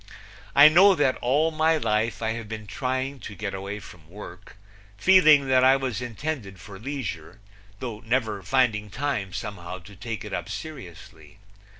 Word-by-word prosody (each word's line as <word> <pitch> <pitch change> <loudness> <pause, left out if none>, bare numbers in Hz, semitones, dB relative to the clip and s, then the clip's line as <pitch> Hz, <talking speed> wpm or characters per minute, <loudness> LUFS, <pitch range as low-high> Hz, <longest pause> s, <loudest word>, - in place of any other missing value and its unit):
I 145 +2 +10
know 190 +5 +6
that 145 -5 +1
all 145 +6 +2
my 160 +1 +2
life 110 -3 -1
I 110 - 0
have 115 -2 -6
been 110 -1 -6
trying 130 +4 -3
to 105 - -9
get 105 -1 -5
away 100 +2 -5
from 80 -6 -15
work, 95 0 -12 0.4
feeling 155 - +6
that 130 -1 +4
I 130 +1 +6
was 130 -5 -3
intended 120 - -5
for 95 0 -11
leisure, 115 - -6 0.4
though 115 -3 -6
never 110 -3 -1
finding 105 0 +1
time 120 -6 -3
somehow 95 -4 -6
to 95 +3 -14
take 110 +3 -6
it 105 - -8
up - - -4
seriously. 95 - -10
115 Hz, 165 wpm, -25 LUFS, 100-135 Hz, 0.4 s, I